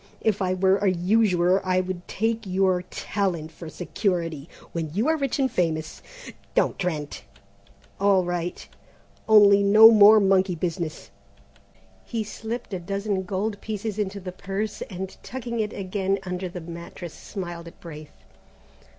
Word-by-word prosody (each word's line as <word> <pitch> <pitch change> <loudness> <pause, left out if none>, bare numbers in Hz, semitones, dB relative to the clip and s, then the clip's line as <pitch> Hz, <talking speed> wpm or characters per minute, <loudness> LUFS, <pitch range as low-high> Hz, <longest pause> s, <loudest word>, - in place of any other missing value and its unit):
If 210 -2 +1
I 185 0 +1
were 190 +1 +3
a 200 0 +2
usurer 185 0 +2
I 185 -1 +1
would 185 -1 -4
take 225 0 -1
your 185 -1 +2
talent 175 -6 -2
for 165 -1 -9
security. 170 -4 -2 0.2
When 165 -2 -3
you 220 +7 +1
are 320 - +3
rich 275 -3 -1
and 265 -3 +1
famous 160 -4 -1 0.3
" - - -16
"Don't, - - +1
Trent 155 -6 -3 0.4
" - - -30
"All 195 -2 +4
right, 175 0 -4 0.6
only 205 -2 +7
no 215 +3 +8
more 215 0 +8
monkey 190 -2 +3
business." 165 -1 -4 0.9
He 230 -2 -3
slipped 220 +1 -6
a 185 - -2
dozen 200 +2 -2
gold 205 +2 -3
pieces 215 -1 -4
into 200 -1 -2
the 185 -1 -6
purse, 195 +3 -4
and 190 0 -6
tucking 240 -2 -5
it 210 -1 -1
again 195 0 -1
under 180 0 -4
the 180 0 -7
mattress 170 0 -8
smiled 175 -4 -7
at 170 - -13
Braith. 155 -3 -11
190 Hz, 150 wpm, -25 LUFS, 175-210 Hz, 0.9 s, no